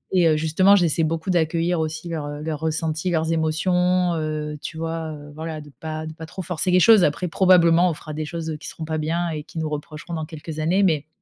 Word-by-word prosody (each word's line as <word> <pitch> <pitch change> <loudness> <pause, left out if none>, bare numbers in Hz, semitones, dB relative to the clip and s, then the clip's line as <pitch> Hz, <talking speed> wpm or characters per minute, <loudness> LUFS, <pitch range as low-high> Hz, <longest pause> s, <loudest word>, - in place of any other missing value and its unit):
et 175 -2 +5
heu, 155 -1 +3
justement, 165 +6 +4
j'essaie 170 -4 +2
beaucoup 165 +3 -1
d'accueillir 170 0 +1
aussi 160 +2 -3
leurs, 160 -3 -4
heu 145 0 -6
leurs 155 -2 -3
ressentis, 160 +2 -1
leurs 160 -1 0
émotions, 180 +3 +1
heu, 155 -1 -3
tu 160 - -6
vois, 165 -1 -3
heu 145 -1 -10
voilà, 160 0 -5
de 145 -1 -12
pas 155 0 -5
de 155 - -6
pas 160 0 -9
trop 185 +3 -7
forcer 180 +1 -2
les 180 0 +5
choses, 215 -1 +7
après, 150 +5 +1
probablement, 175 -1 +5
on 165 - -2
fera 155 - -9
des 155 +1 -3
choses, 160 0 -4
heu, 155 - -4
qui - - -10
seront 160 - -6
pas 160 0 -2
bien 170 +3 -1
et 155 -1 -4
qu'ils 160 - -8
nous 155 - -2
reprocheront 150 +3 -6
dans 160 -1 -3
quelques 155 0 -7
années, 180 +6 +2
mais 155 -5 +1
160 Hz, 240 wpm, -23 LUFS, 155-175 Hz, -, choses